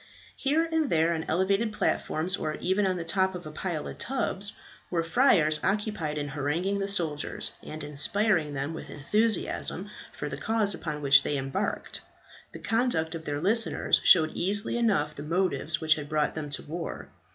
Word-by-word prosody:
Here 300 +4 +1
and 320 -3 +1
there, 165 +1 +2
on 160 -1 -3
elevated 195 +6 +1
platforms, 185 -3 0
or 155 -5 -3
even 190 +2 0
on 185 -1 -1
the 170 - -4
top 190 +2 +1
of 175 - -8
a 155 - -7
pile 160 -1 -4
of - - -9
tubs, 205 -6 -2 0.4
were 170 -2 0
friars 165 - +3
occupied 195 -7 -1
in 145 -1 -3
haranguing 155 +8 -1
the 195 - -2
soldiers, 165 -7 -1
and 155 0 -8
in 145 - -7
inspiring 160 +1 +2
them 140 +4 -3
with 160 - -8
enthusiasm 215 +10 +1 0.2
for - - -6
the - - -5
cause 220 -3 +1
upon 150 -4 -5
which 140 0 +7
they 145 - -2
were - - 0
embarked. 135 0 -3 0.5
The - - -9
conduct 170 -2 0
of 165 -1 -7
their 145 0 -2
listeners 215 +7 +4
showed 155 -3 +6
easily 200 +5 +1
enough 200 -11 +1
the 145 - -9
motives 165 -1 0
which 160 -1 +4
had 150 -2 -7
brought 150 -1 0
them 155 -2 -5
to 145 - -2
war. 165 +2 -6
170 Hz, 185 wpm, -27 LUFS, 150-200 Hz, 0.5 s, which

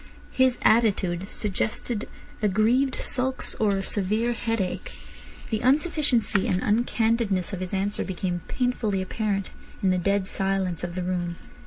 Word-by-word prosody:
His 260 -1 +3
attitude 195 -5 +3
suggested 210 +2 -2 0.3
aggrieved 220 +6 +3
sulks 260 0 0
or 205 -2 +3
a 195 - -2
severe 215 +5 0
headache. 225 -5 -2 0.6
The 220 - +1
unsufficiency 270 - +2
and 180 - +1
uncandidness 220 -3 +1
of 190 - -3
his 185 -1 -4
answer 200 +1 -1
became 180 -2 -3
painfully 225 -6 0
apparent 200 -1 -2 0.3
in 190 - +4
the 185 - +2
dead 200 +2 +1
silence 190 -3 -1
of 175 0 -4
the 185 - -2
room. 175 -1 -2
205 Hz, 135 wpm, -26 LUFS, 185-230 Hz, 0.6 s, in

